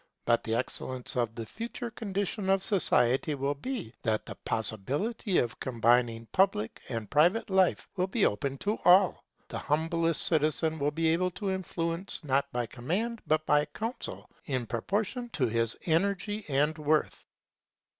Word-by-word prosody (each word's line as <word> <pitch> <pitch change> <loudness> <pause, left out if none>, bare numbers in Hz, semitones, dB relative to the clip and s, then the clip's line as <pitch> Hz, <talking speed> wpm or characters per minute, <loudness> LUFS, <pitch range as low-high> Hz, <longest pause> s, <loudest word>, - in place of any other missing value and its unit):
But 120 0 +3
the 110 - -1
excellence 130 +1 0
of 120 -2 0
the 115 - -5
future 230 - -6
condition 200 -2 -3
of 195 0 +3
society 145 - +2
will 140 +1 -1
be, 170 - -5
that 110 -2 0
the - - -6
possibility 140 - -2
of 120 -2 0
combining 120 -1 +2
public 185 - +1
and 115 -3 -3
private 175 - +3
life 190 -1 +3
will 185 -1 0
be 200 +2 +2
open 135 +7 -1
to 210 +2 0
all. 180 +1 +5 0.2
The - - -5
humblest 165 +2 +1
citizen 155 0 +1
will 145 +1 +2
be 160 +2 0
able 180 +3 +2
to 200 -2 -1
influence 175 -1 -3
not 140 -1 +1
by 120 -1 -1
command 190 - -3
but 155 0 +2
by 150 0 +3
counsel, 225 - -5 0.2
in 130 -4 -2
proportion 205 - -2
to 130 - +1
his 115 -1 0
energy 200 +5 0
and 150 +3 +2
worth. 155 0 +1
155 Hz, 155 wpm, -29 LUFS, 125-195 Hz, 0.2 s, all